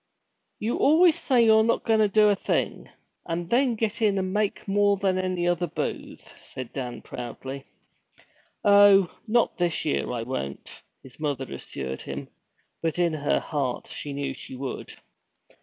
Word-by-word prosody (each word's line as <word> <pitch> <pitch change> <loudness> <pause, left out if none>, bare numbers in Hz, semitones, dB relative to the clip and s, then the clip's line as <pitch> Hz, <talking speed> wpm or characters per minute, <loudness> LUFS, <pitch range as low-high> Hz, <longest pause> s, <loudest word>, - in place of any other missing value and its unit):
'You 220 +3 -2
always 330 +4 +5
say 255 -8 +3
you're 220 0 +6
not 230 +1 +1
going 220 -1 +2
to 215 - +5
do 210 +1 +4
a 205 - +3
thing, - - -2 0.4
and 170 0 -3
then 250 0 +3
get 220 0 -2
in 205 -3 +3
and 185 0 -2
make 210 -1 -1
more 200 0 +3
than 190 -1 +1
any 185 -2 -1
other 175 0 +1
booth!' - - -5
said 130 -2 -8
Dan 125 -3 -5
proudly. 130 +3 -7 1.0
'Oh, 200 -2 +6
not 235 -2 +1
this 175 -2 0
year, 150 - -1
I 120 -2 -3
won't,' 70 - -6 0.2
his 130 +1 -15
mother 145 -3 -2
assured 65 -1 -6
him. - - -7 0.5
But 165 0 -1
in 175 -2 +2
her 145 -2 +1
heart 140 -5 -3
she 145 - -6
knew 140 -1 -3
she 130 - -10
would. 130 +1 -6
180 Hz, 160 wpm, -26 LUFS, 140-210 Hz, 1.0 s, you're